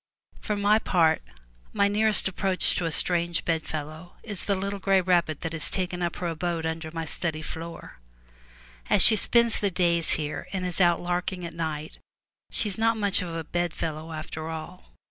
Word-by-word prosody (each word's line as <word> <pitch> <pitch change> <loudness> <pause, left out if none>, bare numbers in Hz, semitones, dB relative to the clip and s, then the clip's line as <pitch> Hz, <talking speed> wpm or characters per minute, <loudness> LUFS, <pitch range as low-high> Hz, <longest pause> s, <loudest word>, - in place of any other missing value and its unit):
For 210 - -2
my 205 +1 +4
part, 165 -6 +3 0.5
my 200 - +3
nearest 210 0 +3
approach 190 0 0
to 175 - -1
a 165 - -1
strange 170 +1 +1
bedfellow 160 +1 -3
is 205 -5 -3
the 200 - +1
little 200 +1 -3
gray 195 0 +3
rabbit 175 -4 +1
that 165 -1 -4
has 160 -2 +1
taken 180 -1 -2
up 175 -1 -1
her 180 - -3
abode 165 0 -2
under 160 0 -3
my 165 0 -4
study 155 0 -3
floor. 165 - -8 0.9
As 190 - +5
she 225 - +8
spends 235 +2 +4
the 200 - +1
day 170 -2 +2
here 155 -2 -1
and 185 -2 -2
is 180 +1 -1
out 175 -1 +4
larking 180 0 -2
at 170 - -6
night, 155 -2 -4 0.5
she 220 - -1
is 200 0 -1
not 225 0 +3
much 200 -2 +1
of 175 -2 -4
a 165 - -3
bedfellow 165 -1 -3
after 155 0 -5
all. 160 +3 -8
175 Hz, 185 wpm, -26 LUFS, 160-195 Hz, 0.9 s, she